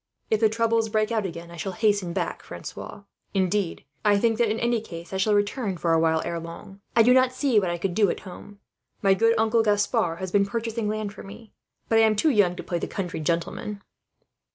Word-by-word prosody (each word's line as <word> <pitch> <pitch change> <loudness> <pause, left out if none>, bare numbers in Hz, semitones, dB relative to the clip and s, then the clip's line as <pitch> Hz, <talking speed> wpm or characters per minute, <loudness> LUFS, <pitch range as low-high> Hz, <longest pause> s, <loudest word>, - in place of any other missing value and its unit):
"If 220 - +3
the 220 -1 +4
troubles 225 0 +1
break 215 +1 0
out 220 -4 0
again, 170 -1 -9
I 170 - -10
shall 190 +3 -4
hasten 205 -4 +1
back, - - -3
Francois; 200 - -9 0.3
indeed, 190 -3 0 0.2
I 205 -1 +4
think 225 +1 +1
that 235 -2 +3
in 220 +1 -1
any 235 -1 +1
case 170 -3 -9
I - - -1
shall 205 +2 +2
return 205 -1 -1
for 165 -1 +1
a 165 - +4
while, 160 0 +2
ere 170 - -3
long. 170 +4 -10
I 230 - +7
do 250 +2 +6
not 255 0 +4
see 255 -4 +2
what 185 -3 -1
I 175 - -2
could 175 +1 -2
do 205 0 +3
at - - -3
home. 195 +2 -11 0.5
My 195 -1 +5
good 230 +4 +3
uncle 225 +1 +3
Gaspard 205 -4 +1
has 185 0 -5
been 200 0 +3
purchasing 230 -1 -2
land 215 -1 -3
for - - -10
me, 205 +2 -12 0.3
but 225 - +3
I - - +6
am 220 -1 +4
too 305 +9 +3
young 200 -7 +3
to - - -7
play 175 - -2
the - - -3
country 180 -5 -4
gentleman." 170 +5 -3
205 Hz, 230 wpm, -25 LUFS, 180-225 Hz, 0.5 s, I